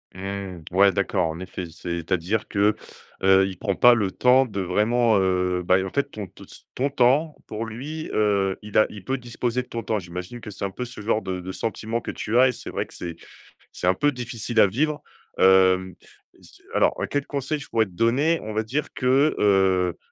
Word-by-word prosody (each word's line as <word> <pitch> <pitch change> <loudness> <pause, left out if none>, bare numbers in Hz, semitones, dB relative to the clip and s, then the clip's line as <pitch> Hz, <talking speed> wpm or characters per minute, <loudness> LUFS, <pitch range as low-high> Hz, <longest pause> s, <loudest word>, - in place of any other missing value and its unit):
Mmh, 95 -2 -6
ouais, 100 +2 +5
d'accord, 85 - 0
en 80 +1 -5
effet, 90 -1 -6
c'est-à-dire 85 +4 -2
que, 105 +1 +2 0.5
heu, 95 0 +5
il 95 - -8
prend 100 -3 -1
pas 120 +4 +7
le 105 -5 +1
temps 125 +6 +4
de 100 -4 -5
vraiment, 110 +4 +2
heu, 90 -1 +1
bah 90 +1 +4
en 95 - -6
fait, 140 - -1
ton 105 -2 -6
te 95 - -17
s - - -16
ton 135 +3 0
temps 140 +4 +2
pour 110 +1 -5
lui, 145 +8 -6
heu, 100 -3 +1
il 105 0 +1
a 110 - +4
il 105 -3 -10
peut 135 0 -1
disposer 120 0 -2
de 125 - -14
ton 115 -1 -5
temps, 110 -1 -1
j'imagine 90 +6 -8
que 105 - -8
c'est 100 0 -5
un 95 - -3
peu 125 - -5
ce 120 -2 -10
genre 110 +1 0
de 95 -1 -4
de 95 +1 -6
sentiment 115 +3 -3
que - - -7
tu 115 +3 0
as 130 - +7
et - - +2
c'est - - -8
vrai - - -3
que - - -15
c'est 85 -2 -6 0.5
c'est 90 - -4
un 90 - +4
peu 145 +8 +2
difficile 120 -2 -3
à 100 - +7
vivre, 145 +8 -1 0.4
hem, 95 -1 +4 0.4
si - - -18
alors, - - +3
heu, - - -1
quel 145 -1 -2
conseil 140 +1 -2
je 135 - -10
pourrais 110 -1 +2
te - - -17
donner, 130 - +2
on 110 - -5
va 110 - +1
dire 135 +7 -3
que, 135 +4 +2
heu, 95 -3 +3
105 Hz, 220 wpm, -24 LUFS, 95-125 Hz, 0.5 s, pas